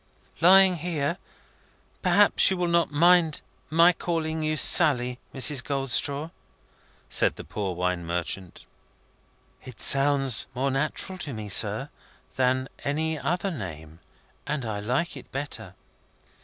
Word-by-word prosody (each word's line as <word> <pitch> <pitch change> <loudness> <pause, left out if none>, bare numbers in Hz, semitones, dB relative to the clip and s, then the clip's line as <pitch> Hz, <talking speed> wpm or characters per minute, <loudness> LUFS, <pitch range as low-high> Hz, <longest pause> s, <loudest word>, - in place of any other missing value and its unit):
"Lying 185 +1 +6
here, 165 0 -3 0.8
perhaps - - +4
you 190 - -1
will 180 - -1
not 170 -1 +1
mind 165 0 +3 0.3
my 165 +3 +5
calling 160 -2 -3
you 155 0 -1
Sally, 125 -7 +3
Mrs. 135 -1 +2
Goldstraw?" 140 +2 -1 0.8
said - - +1
the - - -9
poor 95 -4 -5
wine 90 0 -2
merchant. 85 +1 -5 1.0
"It 125 -3 -12
sounds 135 -3 +3
more 135 +2 -1
natural 155 +7 -3
to 145 -6 -4
me, 110 -2 -7
sir, - - +3 0.5
than 130 0 0 0.2
any 155 +2 -2
other 175 +8 -2
name, 80 - -8 0.5
and 145 -4 -3
I 105 -2 -4
like 125 +11 -2
it - - -13
better." 115 -9 -5
140 Hz, 125 wpm, -25 LUFS, 120-165 Hz, 1.0 s, Lying